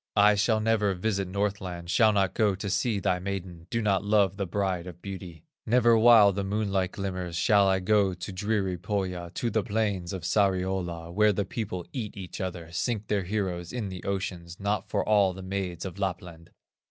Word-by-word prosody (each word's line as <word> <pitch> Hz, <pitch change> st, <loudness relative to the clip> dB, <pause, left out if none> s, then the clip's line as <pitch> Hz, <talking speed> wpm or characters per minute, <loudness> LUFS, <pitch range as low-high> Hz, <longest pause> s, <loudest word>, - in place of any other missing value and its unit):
I 105 Hz, +1 st, +7 dB
shall 110 Hz, +2 st, +2 dB
never 110 Hz, -3 st, +1 dB
visit 100 Hz, 0 st, -1 dB
Northland, 95 Hz, -3 st, -3 dB
Shall 110 Hz, -3 st, +5 dB
not 100 Hz, -2 st, +1 dB
go 105 Hz, -3 st, +2 dB
to 100 Hz, +1 st, -5 dB
see 110 Hz, -1 st, +1 dB
thy 95 Hz, -2 st, 0 dB
maiden, 90 Hz, -3 st, -6 dB
Do 115 Hz, -1 st, -1 dB
not 100 Hz, -2 st, +2 dB
love 100 Hz, -2 st, +3 dB
the 100 Hz, -1 st, -3 dB
Bride 95 Hz, -1 st, -1 dB
of 90 Hz, -2 st, -9 dB
Beauty; 95 Hz, -5 st, -8 dB, 0.2 s
Never 120 Hz, 0 st, +5 dB
while 110 Hz, -3 st, +7 dB
the 100 Hz, +1 st, -2 dB
moonlight 95 Hz, -2 st, -1 dB
glimmers, 90 Hz, -3 st, -4 dB
Shall 100 Hz, +3 st, +4 dB
I 95 Hz, -1 st, +2 dB
go 100 Hz, -1 st, +2 dB
to 90 Hz, +2 st, -7 dB
dreary 95 Hz, -2 st, -1 dB
Pohya, 90 Hz, -2 st, -3 dB
To 120 Hz, -, -1 dB
the 110 Hz, -, +2 dB
plains 100 Hz, -4 st, -1 dB
of 95 Hz, -4 st, -5 dB
Sariola, 90 Hz, -3 st, 0 dB
Where 105 Hz, +2 st, +4 dB
the 100 Hz, +1 st, -1 dB
people 95 Hz, -3 st, -4 dB
eat 110 Hz, -7 st, -5 dB
each 95 Hz, -1 st, -7 dB
other, 85 Hz, -3 st, -5 dB
Sink 110 Hz, +3 st, -2 dB
their 100 Hz, -3 st, 0 dB
heroes 90 Hz, -3 st, -2 dB
in 115 Hz, -5 st, -3 dB
the 95 Hz, -2 st, -8 dB
ocean, 95 Hz, -3 st, -3 dB
Not 100 Hz, +1 st, -2 dB
for -, -, -1 dB
all 100 Hz, -3 st, +4 dB
the 95 Hz, -, -8 dB
maids 95 Hz, -2 st, -4 dB
of 95 Hz, +1 st, -7 dB
Lapland." 90 Hz, -3 st, -4 dB
95 Hz, 190 wpm, -27 LUFS, 90-105 Hz, 0.2 s, I